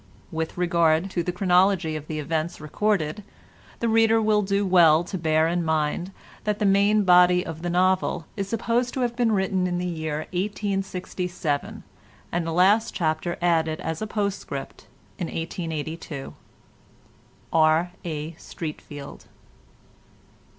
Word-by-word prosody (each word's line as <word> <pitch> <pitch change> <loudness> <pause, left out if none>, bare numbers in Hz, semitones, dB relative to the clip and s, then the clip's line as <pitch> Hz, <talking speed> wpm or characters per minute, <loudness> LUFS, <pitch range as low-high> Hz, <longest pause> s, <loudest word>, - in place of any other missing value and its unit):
With 160 +1 -3
regard 170 0 +2
to 175 - 0
the 180 - -2
chronology 180 -2 +2
of 155 -1 -6
the 155 - -4
events 160 +2 -2
recorded, 175 +3 -1 0.6
the 235 - +1
reader 225 0 +4
will 215 -1 +3
do 200 0 0
well 170 -3 +5
to 180 - -6
bear 160 -2 +2
in 175 +1 0
mind 160 +3 -1 0.3
that 210 -1 0
the 210 - 0
main 200 +2 +4
body 180 -1 +5
of 165 0 -7
the 175 - -2
novel 185 -1 +1
is 195 -2 -3
supposed 235 +2 0
to 265 - -1
have 240 -1 0
been 240 -2 +2
written 190 -2 +1
in 175 -1 -1
the 180 - -2
year 160 -3 -3
1867, 185 -5 -3 0.5
and 170 -1 -1
the - - -1
last 200 +7 +3
chapter 160 +1 -1
added 160 -2 +2
as 160 0 -4
a 215 - -2
postscript 205 -2 -4 0.3
in 175 - -2
1882. 160 -3 -5 1.2
R. 160 +2 +4
A. 155 -2 -4
STREATFEILD. 150 -3 -8
175 Hz, 140 wpm, -25 LUFS, 160-200 Hz, 1.2 s, well